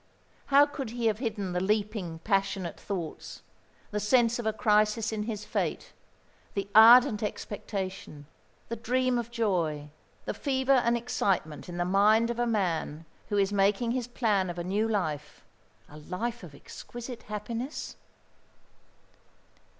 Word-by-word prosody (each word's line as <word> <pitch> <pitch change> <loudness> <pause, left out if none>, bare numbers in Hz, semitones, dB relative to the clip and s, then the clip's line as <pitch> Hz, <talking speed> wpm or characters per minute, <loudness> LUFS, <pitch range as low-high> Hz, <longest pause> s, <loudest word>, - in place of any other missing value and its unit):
How 280 +1 +6
could 285 -4 -6
he 235 0 -4
have 215 -1 +2
hidden 210 -7 -3
the 180 - 0
leaping, 205 -3 -1
passionate 195 -3 -1
thoughts, 175 -6 -6 0.5
the 210 - -1
sense 235 +2 +3
of 230 - -2
a - - +3
crisis 215 0 +2
in 215 -1 -2
his 210 -2 -5
fate, - - -3 0.6
the 200 -1 -2
ardent 225 0 +8
expectation, 190 -7 -5 0.4
the 230 - -3
dream 250 +2 0
of 235 -1 -5
joy, 170 -11 -1 0.3
the - - -2
fever 265 -1 0
and 240 -2 +3
excitement 195 -10 -1
in 175 - -6
the 175 - 0
mind 215 +5 +4
of 235 - -5
a 240 - +1
man 165 -7 -1 0.2
who 205 - 0
is 200 0 +2
making 205 +4 +2
his 245 -1 -2
plan 210 -6 0
of 175 - -6
a 175 - -3
new 205 +5 0
life, 155 -9 -3 0.4
a 150 - -13
life 220 +10 -4
of 165 -6 -11
exquisite 240 - -9
happiness? 230 +6 -5
210 Hz, 145 wpm, -28 LUFS, 190-235 Hz, 0.6 s, ardent